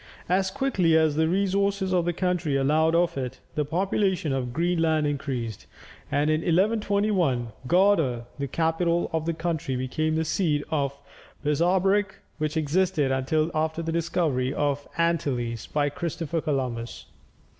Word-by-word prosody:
As 190 +2 +2
quickly 190 -9 +2
as 160 -2 +3
the 160 +1 +2
resources 195 +1 +1
of 175 -2 +2
the 175 - +1
country 180 -4 0
allowed 155 +4 +3
of 170 0 +2
it, 130 0 -5
the 150 - 0
population 185 0 0
of 125 -2 -2
Greenland 165 0 +1
increased, 135 -7 -3 0.4
and 145 +2 +2
in 155 +1 +1
1121, 195 - +1 0.2
Gardar, 165 -9 +3
the 140 - -2
capital 165 +3 0
of 160 0 -1
the 165 - 0
country, 160 -5 -2
became 155 +5 -1
the 160 0 0
seat 155 -2 0
of 140 -3 0
a 140 +1 -10
bishopric, 190 +6 +2 0.2
which 155 +1 -1
existed 155 -2 +1
until 155 +5 0
after 160 +1 -1
the 165 - -2
discovery 160 -6 0
of 145 0 -1
the - - +2
Antilles 125 -9 -1
by 145 -1 0
Christopher 165 +1 -3
Columbus. 125 -6 -3
160 Hz, 145 wpm, -26 LUFS, 140-175 Hz, 0.4 s, as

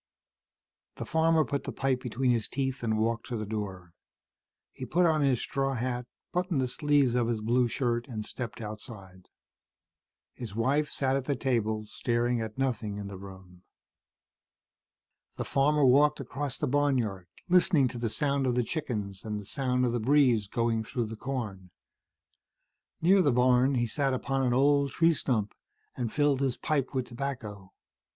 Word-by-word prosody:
The - - -6
farmer 160 -1 +3
put 140 - -3
the - - -3
pipe 130 -2 0
between 125 +1 0
his 115 -3 +1
teeth 135 0 -2
and 110 -2 0
walked 115 +1 -1
to 120 - -3
the 110 - -3
door. 95 -5 -5 0.8
He - - -8
put 170 +8 +2
on 160 -2 +3
his 135 -4 +2
straw 135 -1 -1
hat, 125 0 -3 0.3
buttoned 180 -4 0
the 130 - +1
sleeves 140 0 +2
of 120 -2 +1
his 115 -2 -1
blue 120 +3 +2
shirt 120 0 -1
and 110 -5 -5
stepped 120 -1 -6
outside. 105 -4 -9 1.1
His 115 -5 -7
wife 140 +6 +1
sat 135 -1 0
at 135 -1 -2
the 140 - 0
table, 110 -5 -1
staring 120 +2 -1
at 110 0 -6
nothing 115 -6 -1
in 100 -1 -6
the 100 - -8
room. 95 -2 -12 1.8
The - - -3
farmer 145 +1 +3
walked 145 +4 +5
across 135 +1 -4
the - - -1
barnyard, 125 -10 0 0.2
listening 175 -6 +4
to 120 - -6
the 115 -1 -1
sound 140 +2 0
of 125 - +1
the 125 - +2
chickens 105 - -4
and 105 -1 -3
the 105 - -10
sound 125 +2 0
of 120 - +1
the 120 - -1
breeze 125 -4 +3
going 115 +1 0
through 120 +2 -2
the 115 - -6
corn. 110 -7 -5 1.3
Near 190 +3 +6
the 145 - +3
barn, 125 +2 +3
he 120 -1 +1
sat 135 +3 0
upon 135 +1 -1
an 125 -2 +2
old 140 +1 +3
tree 165 0 +4
stump 110 -8 -1 0.4
and 120 -3 -3
filled 145 -2 +2
his 135 -3 0
pipe 140 -3 -1
with 130 -1 0
tobacco. 115 -7 -6
125 Hz, 170 wpm, -29 LUFS, 110-140 Hz, 1.8 s, Near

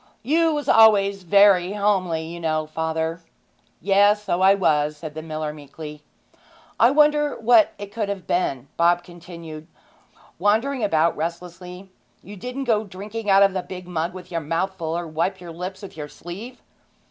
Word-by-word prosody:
'You 325 +6 +2
was 295 -1 -3
always 200 -3 +5
very 195 0 +4
homely, 190 -6 0
you 170 +2 -8
know, 155 -2 -1
father.' 160 +1 -3 0.6
'Yes; 205 +1 +3
so 180 -3 -1
I 195 +1 +6
was,' 150 -5 +1
said 155 0 -8
the 155 - -6
miller 155 -1 -4
meekly. 150 +1 -10 0.8
'I 235 - +6
wonder 295 +1 +3
what 225 -1 +4
it 205 0 -8
could 210 -1 -3
have 200 -2 -5
been,' 140 -7 -1
Bob 175 +1 +3
continued, 170 -3 -11 0.7
wandering 225 +7 +1
about 165 -4 +2
restlessly. 180 +3 -7 0.3
'You 205 +3 -10
didn't 250 +7 -5
go 220 -4 +1
drinking 205 +2 -7
out 195 0 +6
of 195 -1 +3
the 185 - -2
big 180 -1 -9
mug 175 +1 -3
with 185 -1 -11
your 165 -1 -2
mouth 165 +5 -2
full, 165 -2 -3
or 175 - -4
wipe 170 +4 -2
your 175 -1 -9
lips 185 +4 -7
with 200 - -10
your 150 -2 -6
sleeve?' 205 +12 -9
180 Hz, 170 wpm, -23 LUFS, 165-205 Hz, 0.8 s, I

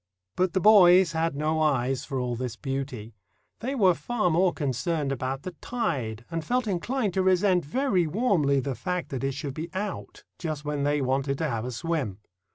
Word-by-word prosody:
But 180 -1 +1
the - - +2
boys 185 -4 +7
had 165 -2 -1
no 155 +2 0
eyes 135 -2 +1
for 135 -3 -3
all 125 -1 -2
this 120 -1 -4
beauty. 130 -5 -5 0.5
They 265 +4 -3
were 190 -8 +5
far 195 +3 -1
more 180 +3 +3
concerned 145 +1 -1
about 135 0 -3
the 185 - -5
tide, 125 - -3
and 165 -1 -2
felt 250 +4 0
inclined 210 +2 -1
to 190 - +1
resent 185 -1 +3
very 185 - +1
warmly 160 - +2
the 135 +1 -2
fact 180 +5 -3
that 135 -1 -4
it 135 0 0
should 140 -1 -4
be 160 +4 -5
out 205 +1 -5 0.2
just 155 -3 -4
when 145 -1 -1
they 145 0 +1
wanted 135 +1 0
to 160 - -1
have 115 0 -2
a 125 - -4
swim. 135 - -2
155 Hz, 190 wpm, -27 LUFS, 135-185 Hz, 0.5 s, boys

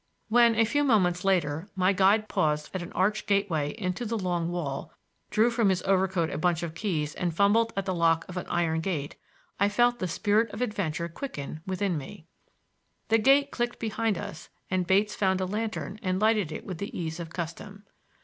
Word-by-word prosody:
When, 235 0 +5
a 225 +1 +4
few 290 +6 +1
moments 185 -9 +2
later, 175 -2 0
my 185 +1 +3
guide 200 +3 +3
paused 150 -4 0
at 185 - -3
an 175 - -7
arched 205 +3 0
gateway 195 -8 +1
in 190 -4 -2
the 230 +3 -3
long 175 -4 -1
wall, 150 -6 -4 0.4
drew 225 +3 +3
from 230 -4 +2
his 185 -1 0
overcoat 190 -3 +1
a 145 - -3
bunch 175 0 +1
of 165 -2 -4
keys 165 -5 -2
and 175 -1 -1
fumbled 220 +4 +3
at 195 - -1
the 190 - -1
lock 165 -1 +2
of 185 - -9
an 180 - -4
iron 165 -2 0
gate, 160 -5 -3 0.4
I 200 +1 +4
felt 240 +3 +2
the 185 - -1
spirit 210 +6 +1
of - - -7
adventure 175 -8 -2
quicken 155 - -6
within 190 -3 -1
me. 145 +3 -10 0.8
The 225 +1 +4
gate 275 +4 +4
clicked 240 0 -2
behind 220 -2 -1
us 160 0 -7 0.2
and 185 -1 0
Bates 205 +3 +3
found 190 -2 +1
a 185 - 0
lantern 215 +1 -4
and 185 -3 -1
lighted 215 -6 +2
it 155 - -6
with 180 -4 -6
the 200 - -5
ease 160 0 -4
of 170 -1 -6
custom. 190 +5 -7
190 Hz, 195 wpm, -27 LUFS, 170-215 Hz, 0.8 s, When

